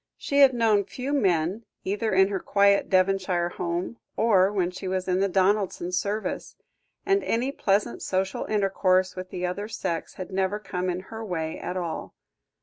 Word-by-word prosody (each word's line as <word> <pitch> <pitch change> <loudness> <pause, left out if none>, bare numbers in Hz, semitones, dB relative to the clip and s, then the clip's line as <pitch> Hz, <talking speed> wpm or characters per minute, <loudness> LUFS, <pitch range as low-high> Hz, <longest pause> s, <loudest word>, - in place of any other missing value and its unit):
She 280 -1 0
had 270 -2 +7
known 220 -3 +3
few 260 +7 -5
men, 190 - +1 0.2
either 210 +3 -1
in 190 +1 +4
her 195 -2 -1
quiet 200 +1 +3
Devonshire 185 -2 +2
home, 175 +6 -3 0.2
or 200 -4 +4
when 185 -3 0
she 185 +1 -7
was 185 0 -2
in 185 0 +1
the 195 - +3
Donaldsons' 190 -1 +1
service, 210 +2 -3 0.5
and 395 0 +2
any 245 +4 0
pleasant 205 -6 0
social 190 0 -1
intercourse 190 -3 +1
with 185 0 -6
the 180 0 -3
other 200 +4 -3
sex 175 -6 -4
had 185 0 -7
never 190 +2 0
come 185 -3 -3
in 180 +1 -2
her 225 0 -6
way 160 -6 -3
at 185 - -4
all. 170 -3 -4
190 Hz, 170 wpm, -26 LUFS, 185-210 Hz, 0.5 s, had